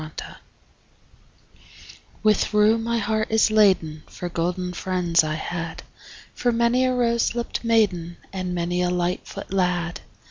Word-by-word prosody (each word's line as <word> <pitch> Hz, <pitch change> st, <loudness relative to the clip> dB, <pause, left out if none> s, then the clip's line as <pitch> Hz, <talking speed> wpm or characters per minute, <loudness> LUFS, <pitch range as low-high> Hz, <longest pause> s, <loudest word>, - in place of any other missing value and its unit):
LIV 155 Hz, 0 st, -8 dB, 2.1 s
With 215 Hz, 0 st, +2 dB
rue 215 Hz, +2 st, +5 dB
my 235 Hz, +1 st, -1 dB
heart 220 Hz, 0 st, -1 dB
is 220 Hz, 0 st, +3 dB
laden 185 Hz, -8 st, +3 dB
For 175 Hz, -, -6 dB
golden 180 Hz, +1 st, -2 dB
friends 175 Hz, -2 st, +1 dB
I 155 Hz, 0 st, -2 dB
had, 165 Hz, +1 st, -5 dB, 0.5 s
For 245 Hz, -, 0 dB
many 235 Hz, +2 st, +2 dB
a 255 Hz, 0 st, +1 dB
rose 235 Hz, -1 st, +1 dB
lipt 235 Hz, 0 st, -3 dB
maiden 195 Hz, -7 st, +1 dB, 0.2 s
And 185 Hz, -2 st, -3 dB
many 175 Hz, +1 st, -1 dB
a 180 Hz, -, +1 dB
lightfoot 180 Hz, +1 st, -3 dB
lad. 180 Hz, -2 st, 0 dB
185 Hz, 135 wpm, -23 LUFS, 175-220 Hz, 2.1 s, rue